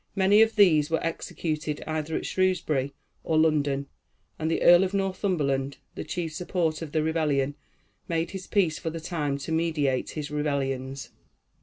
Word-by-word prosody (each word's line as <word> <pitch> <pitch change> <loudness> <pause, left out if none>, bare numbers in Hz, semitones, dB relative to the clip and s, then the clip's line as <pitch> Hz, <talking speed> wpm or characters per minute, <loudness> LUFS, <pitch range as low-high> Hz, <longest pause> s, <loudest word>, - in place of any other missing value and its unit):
Many 200 +2 +5
of 225 0 +3
these 160 -8 +5
were 165 - 0
executed 155 -2 -3
either 155 0 -3
at - - -5
Shrewsbury 160 -7 0 0.3
or 160 - +1
London; 145 -3 +2 0.5
and 160 0 -1
the 165 - 0
Earl 175 +2 +8
of 190 +1 -2
Northumberland, 170 -9 -1 0.2
the - - -5
chief 165 -3 -4
support 170 -2 -1
of 160 -3 -6
the 155 0 +1
rebellion, 150 -4 +1 0.5
made 165 0 -1
his 190 -1 -7
peace 175 -7 +1
for 165 - -3
the 165 +1 -5
time 150 -4 -2
to 140 +3 -6
meditate 155 -5 0
his 150 -1 -4
rebellions. 135 -2 -2
160 Hz, 160 wpm, -27 LUFS, 145-175 Hz, 0.5 s, Earl